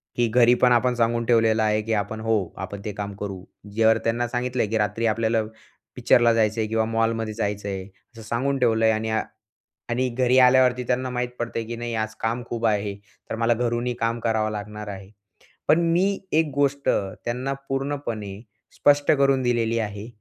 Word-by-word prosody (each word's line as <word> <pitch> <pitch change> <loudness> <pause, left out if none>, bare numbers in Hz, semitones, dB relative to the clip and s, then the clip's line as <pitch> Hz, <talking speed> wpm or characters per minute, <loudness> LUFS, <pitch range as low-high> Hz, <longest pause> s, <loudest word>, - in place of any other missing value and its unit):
की 120 -1 +2
घरी 120 +1 +5
पण 125 - +5
आपण 125 +1 +3
सांगून 115 0 +1
ठेवलेलं 115 -1 +3
आहे, 105 0 +1
की 110 +1 -2
"आपण 105 +1 -2
हो 110 -5 0
आपण 100 +1 -6
ते 105 - -2
काम 100 0 -5
करू." 100 -2 -6 0.3
जर 110 0 +5
त्यांना 120 +1 0
सांगितलं 125 +1 -2
आहे, 105 - 0
की 110 - 0
"रात्री 110 +2 -1
आपल्याला 110 0 +1 0.5
पिक्चरला 120 -1 +4
जायचं 110 0 +1
आहे 110 - -1
किंवा 110 0 0
मॉलमध्ये 115 -1 -1
जायचं 105 -2 -3
आहे," 95 -1 -4
असं 110 +3 -17
सांगून 130 +5 -1
ठेवलं 115 -3 +2
आहे. 110 - +4
आणि 110 +1 -2
अ, 110 0 +1 0.7
आणि 125 +2 0
घरी 125 +1 +2
आल्यावरती 125 0 +5
त्यांना 130 +1 0
माहीत 125 -1 -2
पडते, 115 -1 -3
की 115 +1 -6
नाही 120 0 -4
आज 110 0 -3
काम 115 +2 -2
खूप 115 -1 -2
आहे. 105 -2 0 0.3
तर - - -2
मला 115 +1 +2
घरूनही 120 +1 -1
काम 115 0 0
करावं 110 -1 0
लागणार 105 0 -6
आहे. 100 -1 -8 0.6
पण 160 - +5
मी 195 +3 +2
एक 160 0 +3
गोष्ट 140 0 0 0.4
त्यांना 125 +3 -2 0.2
पूर्णपणे 135 -8 -3 0.4
स्पष्ट 145 0 +4
करून 140 -2 +3
दिलेली 115 -2 +1
आहे. 105 -1 -4
115 Hz, 185 wpm, -24 LUFS, 110-125 Hz, 0.7 s, घरी